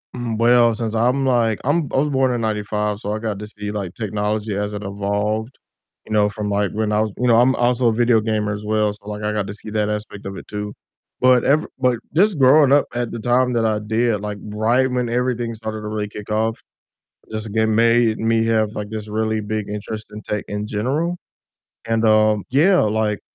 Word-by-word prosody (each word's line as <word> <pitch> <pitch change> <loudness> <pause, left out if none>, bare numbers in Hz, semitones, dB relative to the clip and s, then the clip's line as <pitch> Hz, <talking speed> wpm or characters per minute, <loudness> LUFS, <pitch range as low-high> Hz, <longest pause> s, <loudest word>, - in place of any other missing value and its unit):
Mhm, 120 -3 -3
well, 120 -1 +4
since 115 -1 -3
I'm, 125 +4 +1
like, 115 -4 +2
I'm 145 +1 +1
I - - -1
was 150 +2 +2
born 130 -2 +2
in 120 - -2
'95, 105 -1 -1
so 105 0 -3
I 110 - -3
got 110 -3 -3
to 105 - -7
see, 105 -1 -6
like, 100 -4 -5
technology 105 -1 -2
as 105 +1 -2
it 105 0 -5
evolved, 105 +4 -2 0.5
you 110 - -6
know, 105 -1 +3
from, 105 0 -4
like, 100 -1 0
when 110 0 -1
I 105 0 +2
was 110 -1 -1
you 125 - 0
know, 115 -1 +5
I'm 130 +2 +4
also 120 0 +2
a - - +4
video 120 -1 +3
gamer 105 -1 -1
as 105 +1 -6
well, 105 -1 +1
so, 105 0 -17
like, 105 0 -5
I 105 - 0
got 105 -2 -2
to 105 - -5
see 105 0 -9
that 105 -1 0
aspect 105 -1 -5
of 95 0 -6
it - - -10
too, 105 0 -5 0.5
but 125 -1 +5
ev 150 +3 +3
but 125 -2 +2 0.2
just 195 0 +3
growing 135 +1 +6
up 145 0 +5
at 120 -1 -2
the 115 - -5
time 125 +2 +2
that 115 -1 +1
I 110 -1 +1
did, 110 0 0
like, 105 0 -4 0.2
right 120 +5 +2
when 125 -1 -1
everything 120 -1 -1
started 110 0 -5
to 105 - -6
really 105 -1 -3
kick 105 0 -9
off, 110 +1 -1 0.7
just 110 0 -4
again 110 +1 +1
made 115 -1 +3
me 115 0 +2
have, 110 -2 +1
like, 105 -1 -5
this 110 -1 -5
really 110 0 -1
big 105 0 -3
interest 105 +1 -5
in 105 - -7
tech 105 -1 -4
in 105 +1 -4
general, 140 +12 -1 0.7
and, 115 0 0
um 110 -1 +4
Yeah, 175 +8 +4
like, 105 -1 0
110 Hz, 225 wpm, -20 LUFS, 105-120 Hz, 0.7 s, growing